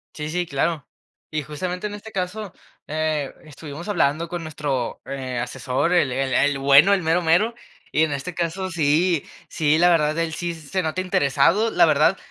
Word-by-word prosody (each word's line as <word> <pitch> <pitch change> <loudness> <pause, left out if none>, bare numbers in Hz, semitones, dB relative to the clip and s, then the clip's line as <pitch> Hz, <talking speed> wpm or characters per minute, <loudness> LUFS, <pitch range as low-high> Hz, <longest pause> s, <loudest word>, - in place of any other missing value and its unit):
Sí, 150 0 -5
sí, 175 +2 -1
claro. 150 +1 -1 0.5
Y 155 - -1
justamente 180 +7 -4
en 205 - -7
este 215 +1 -9
caso, 195 +1 -4 0.4
eh, 155 -2 -1
estuvimos 150 +3 -9
hablando 165 -4 +1
con 175 0 -5
nuestro, 145 -6 -3
eh, 130 -2 -5
asesor, 130 +6 -1
el 145 -7 +3
el 130 0 -1
el 145 0 +2
bueno, 140 +8 +6
el 195 - +2
mero 165 +2 +2
mero 175 +8 +3 0.4
y 155 - +4
en 155 - 0
este 145 +5 -4
caso, 175 +3 -2
sí 165 0 +2 0.3
sí, 155 0 +2
la 175 +2 +5
verdad, 155 -2 +2
él 165 -1 -1
sí 175 +2 -3
se 165 +3 -3
nota 160 +3 -2
interesado, 180 +5 +2
la - - +5
verdad, - - +3
160 Hz, 180 wpm, -22 LUFS, 145-180 Hz, 0.5 s, bueno